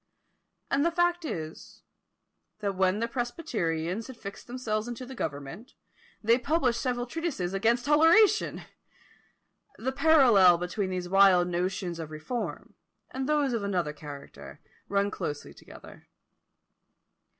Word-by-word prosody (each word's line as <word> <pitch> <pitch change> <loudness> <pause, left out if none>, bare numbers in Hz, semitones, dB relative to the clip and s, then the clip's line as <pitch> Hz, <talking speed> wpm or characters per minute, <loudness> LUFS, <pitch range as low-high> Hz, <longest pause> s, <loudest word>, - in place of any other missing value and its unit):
And 280 +1 +2
the 335 - +3
fact 350 0 +1
is, 160 - -7 0.7
that 205 -2 -2
when 190 +1 +2
the 230 - 0
presbyterians 225 - -3
had 260 -3 -10
fixed 200 -3 -9
themselves 230 -3 -3
into 240 +1 -6
the 265 - -9
government, 145 - -6 0.5
they 230 +3 +4
published 260 -4 +1
several 245 -2 -1
treatises 255 - -3
against 230 +5 +1
toleration! 330 +9 +4 1.1
The 260 +4 -2
parallel 250 - +6
between 180 +3 -3
these 180 -1 -3
wild 185 -2 +5
notions 175 0 -2
of 160 -2 -6
reform, 155 +11 -5 0.4
and 265 +2 -3
those 290 -4 +2
of 230 - -1
another 180 -7 -1
character, 140 - -10 0.3
run 200 0 +1
closely 150 -7 -5
together. - - -14
215 Hz, 125 wpm, -28 LUFS, 180-260 Hz, 1.1 s, parallel